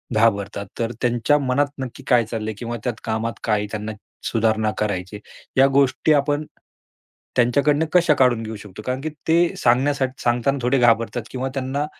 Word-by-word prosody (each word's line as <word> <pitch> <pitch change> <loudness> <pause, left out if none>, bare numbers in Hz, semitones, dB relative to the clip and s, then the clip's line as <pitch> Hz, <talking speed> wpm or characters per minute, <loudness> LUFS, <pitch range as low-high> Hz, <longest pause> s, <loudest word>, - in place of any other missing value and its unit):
घाबरतात. 100 -2 +1
तर 115 0 -1
त्यांच्या 120 +4 +2
मनात 140 +1 +1
नक्की 130 -2 -6
काय 120 -2 +4
चाललंय 110 -1 -4
किंवा 120 0 -4
त्यात 120 -3 -1
कामात 115 +1 -2
काय 105 -2 +1
त्यांना 105 0 -4 0.3
सुधारणा 110 -1 +1
करायची. 100 -1 -3 0.4
या 135 +1 +7
गोष्टी 140 +3 +3
आपण 145 +1 +1 0.9
त्यांच्याकडनं 140 +5 +3
कशा 170 -3 +5
काढून 125 -4 +3
घेऊ 110 0 -6
शकतो? 105 -1 -10
कारण 130 +1 -2
की 155 - -3 0.2
ते 170 +1 +3
सांगण्यासाठी 130 +1 +1
सांगताना 120 +3 +1
थोडे 125 +3 +2
घाबरतात 115 0 +2
किंवा 130 +1 -3
त्यांना 135 +2 -2
120 Hz, 155 wpm, -22 LUFS, 110-135 Hz, 0.9 s, या